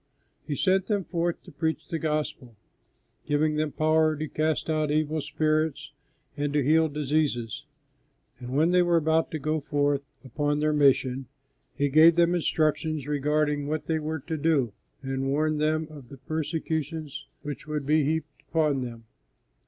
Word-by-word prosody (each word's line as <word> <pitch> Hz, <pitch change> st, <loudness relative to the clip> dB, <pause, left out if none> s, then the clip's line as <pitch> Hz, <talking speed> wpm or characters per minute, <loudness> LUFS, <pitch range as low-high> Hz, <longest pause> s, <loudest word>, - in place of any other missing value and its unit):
He 145 Hz, -, -2 dB
sent 190 Hz, +4 st, +2 dB
them 205 Hz, -3 st, 0 dB
forth 170 Hz, -1 st, -2 dB
to 180 Hz, -, -13 dB
preach 160 Hz, +1 st, -2 dB
the 165 Hz, -2 st, -3 dB
gospel, 150 Hz, -6 st, -3 dB, 0.7 s
giving 150 Hz, +1 st, +2 dB
them 150 Hz, 0 st, -1 dB
power 155 Hz, +1 st, +2 dB
to 155 Hz, +1 st, -4 dB
cast 155 Hz, +1 st, -1 dB
out 155 Hz, -2 st, 0 dB
evil 155 Hz, +1 st, 0 dB
spirits 155 Hz, -2 st, -1 dB, 0.4 s
and 145 Hz, -1 st, -1 dB
to 145 Hz, -1 st, +2 dB
heal 160 Hz, +3 st, +4 dB
diseases; 145 Hz, -3 st, -1 dB, 0.7 s
and 125 Hz, -1 st, -8 dB
when 160 Hz, +4 st, +3 dB
they 180 Hz, 0 st, +5 dB
were 175 Hz, -1 st, +3 dB
about 160 Hz, 0 st, +2 dB
to 155 Hz, -, -3 dB
go 155 Hz, +2 st, -1 dB
forth 145 Hz, -1 st, 0 dB, 0.2 s
upon 145 Hz, +3 st, -1 dB
their 155 Hz, 0 st, +2 dB
mission, 135 Hz, -3 st, +2 dB, 0.5 s
He 145 Hz, -, +1 dB
gave 160 Hz, +4 st, +7 dB
them 170 Hz, 0 st, +4 dB
instructions 155 Hz, -3 st, 0 dB
regarding 150 Hz, 0 st, 0 dB
what 155 Hz, +1 st, -2 dB
they 160 Hz, -1 st, 0 dB
were 155 Hz, 0 st, -3 dB
to 160 Hz, +3 st, -4 dB
do, 145 Hz, -7 st, +1 dB, 0.3 s
and 135 Hz, 0 st, -2 dB
warned 150 Hz, +2 st, +1 dB
them 155 Hz, +1 st, +1 dB
of 140 Hz, -6 st, -12 dB
the 140 Hz, -, -10 dB
persecutions 155 Hz, 0 st, -3 dB, 0.2 s
which 145 Hz, -1 st, -6 dB
would 150 Hz, -2 st, -3 dB
be 155 Hz, +1 st, +3 dB
heaped 155 Hz, 0 st, -2 dB
upon 150 Hz, -4 st, +1 dB
them. 120 Hz, -2 st, -6 dB
155 Hz, 160 wpm, -27 LUFS, 145-160 Hz, 0.7 s, gave